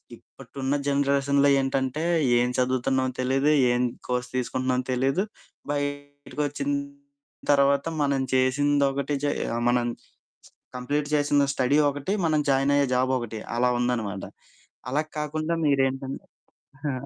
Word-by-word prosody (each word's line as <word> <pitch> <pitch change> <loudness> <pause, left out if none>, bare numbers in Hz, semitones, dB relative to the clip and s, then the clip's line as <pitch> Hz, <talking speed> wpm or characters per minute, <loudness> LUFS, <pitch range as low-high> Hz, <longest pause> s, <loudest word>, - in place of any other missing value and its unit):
ఇప్పుడున్న 135 +1 -5
జనరేషన్‌లో 140 0 +2
ఏంటంటే, 135 +2 -1 0.4
ఏం 125 +1 +1
చదువుతున్నామో 130 +1 +1
తెలీదు, 135 +3 +1 0.2
ఏం 120 0 +1 0.3
కోర్స్ 125 0 -2
తీసుకుంటున్నామో 130 0 -1
తెలీదు, 135 +9 +1 0.5
బయటికొచ్చిన 145 - -3 0.8
తర్వాత 140 0 +3 0.2
మనం 140 -2 +1
చేసింది 140 +2 +2
ఒకటి, 140 +1 -2
చేయ 130 -4 -1
మనం 120 0 +2 0.9
కంప్లీట్ 145 +4 -2
చేసిన 145 -1 +3
స్టడీ 135 +3 +2
ఒకటి, 145 +7 -3
మనం 155 -2 +2
జాయినయ్యే 140 +1 +3
జాబొకటి 125 -3 -1 0.2
అలా 125 +1 +3
ఉందనమాట. 115 -5 -1 0.7
అలా 150 +4 0
కాకుండా 155 +2 -2
మీరేంటం 135 -1 +1 0.8
ఆ! - - -2
135 Hz, 105 wpm, -25 LUFS, 130-145 Hz, 0.9 s, తర్వాత